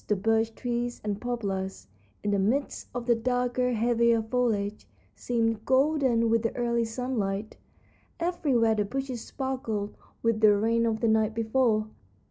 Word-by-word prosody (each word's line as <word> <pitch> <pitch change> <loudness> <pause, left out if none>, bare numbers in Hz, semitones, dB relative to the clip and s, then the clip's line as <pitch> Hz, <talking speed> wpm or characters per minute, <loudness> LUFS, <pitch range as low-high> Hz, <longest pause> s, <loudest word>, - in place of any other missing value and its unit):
The 210 - +2
birch 225 +3 +1
trees 240 0 -3
and 210 -1 -3
poplars, 200 -6 -3 0.4
in 205 - 0
the 200 - +2
midst 245 +9 -1
of 245 -1 -5
the 240 - +4
darker, 250 +1 0
heavier 235 0 +2
foliage, 220 -3 -1 0.3
seemed 225 -2 -1
golden 265 -4 +2
with 230 -1 +3
the 230 - -2
early 235 -1 0
sunlight. 225 -4 -3 0.6
Everywhere 285 -10 +2
the 210 -1 +1
bushes 260 +1 -4
sparkled 230 -7 -4 0.3
with 230 -1 +2
the 210 -2 +6
rain 230 +2 +2
of 220 -1 -1
the 230 - +2
night 220 0 +2
before. 225 -1 +2
230 Hz, 145 wpm, -27 LUFS, 215-245 Hz, 0.6 s, the